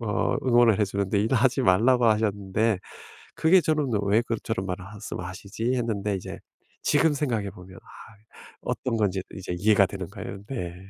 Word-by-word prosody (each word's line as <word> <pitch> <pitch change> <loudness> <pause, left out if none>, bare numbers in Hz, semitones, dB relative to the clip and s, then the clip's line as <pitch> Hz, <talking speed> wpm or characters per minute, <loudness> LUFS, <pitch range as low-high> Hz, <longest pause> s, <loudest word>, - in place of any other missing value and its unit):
어 105 -3 0
응원을 120 -4 +4
해 - - +5
주는데 100 +1 -1
"일하지 130 +4 +2
말라"고 120 +5 +4
하셨는데 105 -1 +1 0.6
그게 180 +3 +5
저는 150 -3 0
'왜 105 +3 +3
그 115 -1 -2
저런 110 -4 -2
말을 90 0 -5
말씀하시지?' 105 +3 -5
했는데 105 -4 -1
이제 95 - -7 0.4
지금 160 -2 +3
생각해 115 -9 -1
보면 95 -1 -13
아 110 - -15 0.5
어떤 120 -3 -2
건지 95 -3 0
이제 95 -2 -5
이해가 100 +1 +4
되는 95 -2 -6
거예요. 100 -1 -8
네. 90 -10 -5
105 Hz, 335 characters per minute, -26 LUFS, 95-120 Hz, 0.6 s, 해